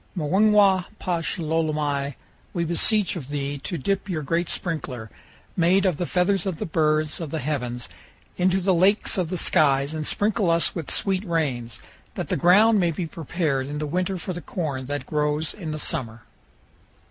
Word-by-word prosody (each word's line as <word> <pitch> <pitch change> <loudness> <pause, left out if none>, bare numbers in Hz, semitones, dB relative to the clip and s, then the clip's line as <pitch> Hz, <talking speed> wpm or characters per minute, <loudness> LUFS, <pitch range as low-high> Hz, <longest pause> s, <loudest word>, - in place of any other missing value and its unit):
Muingwa 195 +3 +4
pash 175 -2 -2
lolomai, 150 -4 -1 0.4
we 170 - 0
beseech 190 +5 +3
of 145 -6 -7
thee 145 -1 -3
to 175 +5 -4
dip 195 +7 -2
your 160 -4 -2
great 165 +4 -1
sprinkler, 130 - -3 0.4
made 185 +3 +3
of 180 -6 +1
the 175 - -2
feathers 185 +1 +1
of 185 -4 -2
the 215 - -3
birds 155 -2 0
of 160 - -4
the 160 - -3
heavens, 125 -5 -3 0.5
into 185 +1 +2
the 190 +1 +2
lakes 195 +3 +2
of 175 -3 -1
the 185 - -2
skies 140 -4 +3
and 155 -1 -3
sprinkle 205 -2 +1
us 165 0 +2
with 165 -5 -5
sweet 190 -1 +1
rains, 130 - -2 0.4
that - - -4
the - - +1
ground 205 +8 +5
may 175 -2 +2
be 165 +2 -3
prepared 155 -4 -2
in 145 +1 -5
the 150 - -2
winter 180 +5 -1
for 180 +2 -5
the 175 - -6
corn 145 -6 -4
that 145 -2 -3
grows 150 +1 -1
in 175 -7 -7
the 155 - -3
summer." 115 -6 -2
165 Hz, 180 wpm, -24 LUFS, 145-185 Hz, 0.5 s, ground